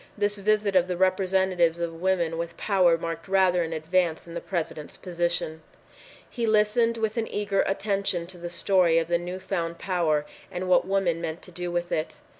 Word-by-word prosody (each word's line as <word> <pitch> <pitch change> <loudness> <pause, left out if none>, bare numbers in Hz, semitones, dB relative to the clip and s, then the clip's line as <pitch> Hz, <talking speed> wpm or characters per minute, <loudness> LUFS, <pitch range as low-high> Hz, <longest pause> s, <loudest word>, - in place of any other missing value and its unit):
This 205 0 0
visit 210 -1 +1
of 180 -1 +4
the 180 -1 -2
representatives 185 -2 +2
of 165 -1 -4
women 175 -3 +1
with 170 0 -5
power 185 -5 +3
marked 165 +1 -5
rather 190 -2 +3
an 165 -1 -2
advance 165 +1 0
in 170 - -10
the 170 - -4
President's 160 -4 -4
position. 170 -3 -2 0.7
He 235 -2 -3
listened 220 +2 +3
with 220 0 -1
an 225 - 0
eager 200 -1 0
attention 195 -3 -1
to 175 0 -10
the 175 0 -5
story 175 -1 +3
of 165 -1 +1
the 170 0 +2
new 180 +1 -5
found 170 -3 -3
power 165 -5 0 0.3
and 180 +1 -4
what 185 0 +4
women 190 -4 +1
meant 160 -1 -4
to 180 - -11
do 175 0 -4
with 175 0 -2
it. 155 0 -2
180 Hz, 190 wpm, -26 LUFS, 170-195 Hz, 0.7 s, of